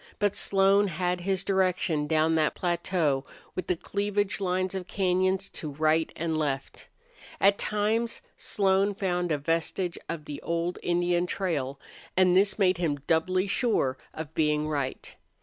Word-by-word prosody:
But 205 -2 +1
Slone 195 +1 +3
had 180 0 -1
his 190 +1 -1
direction 180 -6 +1
down 160 +1 +2
that 155 -2 +2
plateau 170 -5 0 0.3
with 185 - -4
the 180 - +1
cleavage 205 +3 -2
lines 185 0 0
of 185 -2 -4
cañons 185 0 0
to 155 - -5
right 155 +2 +1
and 165 -1 -2
left. 145 -3 -3 0.5
At 200 +1 +4
times 220 +3 0
Slone 195 0 +1
found 180 -3 -1
a 150 - +2
vestige 165 +4 -1
of 155 -3 -4
the 145 -2 -7
old 170 +1 -2
Indian 175 0 +1
trail, 145 -9 -2 0.4
and 185 -1 +5
this 195 +1 +3
made 185 -4 +3
him 160 -5 +1
doubly 185 +4 +2
sure 200 - +1 0.2
of 160 -1 -7
being 150 -1 +1
right. 140 -4 -3
180 Hz, 150 wpm, -28 LUFS, 160-195 Hz, 0.5 s, and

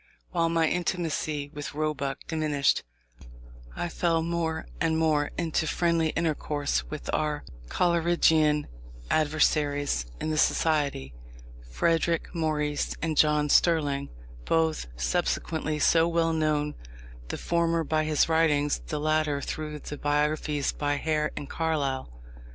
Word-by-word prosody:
While 170 -2 +1
my 165 -1 +2
intimacy 160 -5 -2
with 145 -1 -6
Roebuck 145 -3 -2
diminished, 150 -4 +1 0.9
I - - -2
fell 165 -1 0
more 165 -1 -2
and 160 -1 +1
more 155 -2 +2
into 160 -2 0
friendly 170 -1 +1
intercourse 150 -3 -1
with 150 - -7
our 150 -1 -1 0.3
Coleridgian 165 -3 +3 0.5
adversaries 145 - +1
in 155 - -2
the 155 - 0
Society, 145 - +1 0.6
Frederick 165 - 0
Maurice 150 -3 -1
and 160 -2 0
John 150 0 +3
Sterling, 145 -3 +2 0.4
both 160 - +1
subsequently 60 - -1
so 165 +2 +4
well 165 -1 +1
known, 150 -2 0 0.5
the - - -4
former 170 -1 +1
by 155 0 0
his 155 -1 +2
writings, 150 -3 +2
the 150 - -3
latter 155 -1 +1
through 150 +2 -5
the 145 0 -8
biographies 150 0 0
by 145 0 -1
Hare 150 +1 0
and 145 - -5
Carlyle. 145 - -1
155 Hz, 120 wpm, -27 LUFS, 145-165 Hz, 0.9 s, so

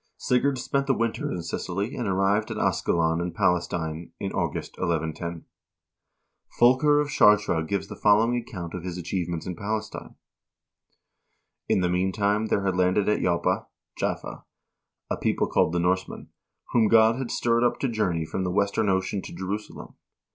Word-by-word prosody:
'" - - -55
Sigurd 130 +2 +2
spent 135 +2 -1
the 135 - +3
winter 115 -1 -1
in 85 - -4
Sicily 95 +6 -3
and 120 - -3
arrived 100 +3 +1
at - - -4
Ascalon 80 0 +1
in 85 0 -2
Pales 90 -1 +1
tine 80 0 -4
in 100 - -3
August, - - -3
1110.1 85 -1 -2 1.2
Fulker 130 +5 +5
of 150 -1 -1
Chartres 105 - +4
gives 100 +2 -2
the - - -8
following 110 +3 +3
ac 120 - -6
count 85 -5 -6
of 90 - -5
his 90 -1 -5
achievements 85 -1 -3
in 90 - -4
Palestine: 105 +3 -5 1.5
2 - - +4
"In - - +2
the 90 - +1
meantime 100 +4 +1
there 100 -2 0
had 95 -2 +1
landed 90 +2 +2
at 105 - +2
Joppa 85 -1 0 0.3
(Jaffa) - - -4 0.7
a - - 0
people - - 0
called - - +2
the 85 - 0
Norsemen, 90 +2 -1 0.4
whom 115 -3 +4
God 115 +1 +5
had 130 -2 -4
stirred 120 0 +1
up 120 - +2
to 135 - +1
journey 95 -9 -1
from 95 - -3
the 90 - -1
western 100 +2 +1
ocean 95 +1 0
to - - -9
Jerusalem. 95 +4 -6
95 Hz, 170 wpm, -26 LUFS, 90-110 Hz, 1.5 s, Fulker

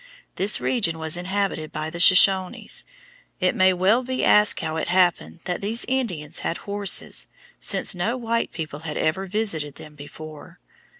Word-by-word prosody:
This 195 +3 +3
region 185 -10 0
was 160 0 -1
inhabited 185 -3 -2
by 155 +1 -5
the 170 - -7
Shoshones. 185 +1 +3 0.5
It 185 -1 +1
may 185 0 +4
well 190 +7 +2
be 255 +1 -2
asked 210 0 +4
how 155 - -3
it - - -3
happened 175 -1 +1
that 180 -1 -3
these 220 +4 +2
Indians 220 - -2
had 165 - -3
horses, 200 -2 +1 0.3
since - - 0
no 215 +8 -2
white 230 -1 -2
people 155 -3 -6
had 155 -1 -6
ever 190 +5 -1
visited 180 -8 -2
them 150 - -12
before. 155 +4 -12
185 Hz, 160 wpm, -23 LUFS, 160-205 Hz, 0.5 s, may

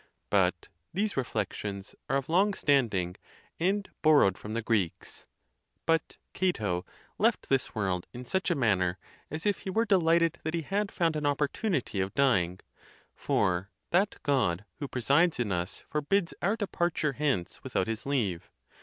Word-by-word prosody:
But - - +2 0.2
these 205 +4 -1
reflections 105 -6 -3 0.2
are 135 - +3
of 135 -1 -3
long 195 +5 +3
standing, 105 -11 +1 0.4
and 195 +4 +1
borrowed 145 - +5
from 105 +4 -7
the 115 - -1
Greeks. 105 -7 -2 0.6
But 165 -1 +1 0.2
Cato 105 - 0 0.3
left - - +2
this 135 -3 +1
world 95 -4 -1
in 125 +1 -8
such 190 +10 0
a 175 - +2
manner 95 - +2 0.3
as 155 +5 -5
if 205 -1 +2
he - - -6
were 225 +5 +2
de 200 -4 +4
lighted 165 -1 +3
that 160 +2 -2
he 165 - -2
had 200 +5 -1
found 165 -3 +1
an 150 -1 0
opportunity 145 - 0
of 95 +1 -3
dying; 95 -11 +2 0.5
for 95 -1 0 0.2
that 195 +4 +3
God 105 -9 +1
who 145 - -3
presides 140 +6 +2
in 115 -5 0
us 90 +1 -3
forbids 170 +5 0
our 200 +5 +2
departure 175 -8 -1
hence 135 -11 -1
without - - 0
his 115 +3 -4
leave. 110 -12 -1
140 Hz, 155 wpm, -29 LUFS, 105-170 Hz, 0.6 s, borrowed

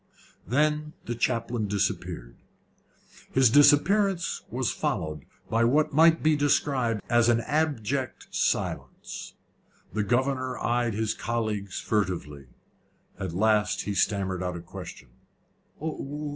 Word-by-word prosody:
Then 150 +5 +1
the 120 - -2
chaplain 115 -2 -1
disappeared. 95 -11 -2 1.0
His 130 -3 +5
disappearance 175 - +4
was - - -1
followed 75 -2 -3 0.2
by 115 +1 +2
what 145 +6 +2
might 160 +2 +5
be 155 0 +4
described 135 -6 +1
as 120 0 +4
an 120 0 +3
abject 140 -4 -1
silence. - - -2 0.6
The 110 - 0
governor 130 +3 0
eyed 120 -2 0
his 110 0 0
colleagues 110 -4 -3
furtively. 85 - -2 0.7
At 95 -4 -4
last 105 +1 +2
he 100 - -3
stammered 95 -2 0
out 90 -1 -3
a - - -7
question. 85 - -10
115 Hz, 110 wpm, -27 LUFS, 100-140 Hz, 1.0 s, His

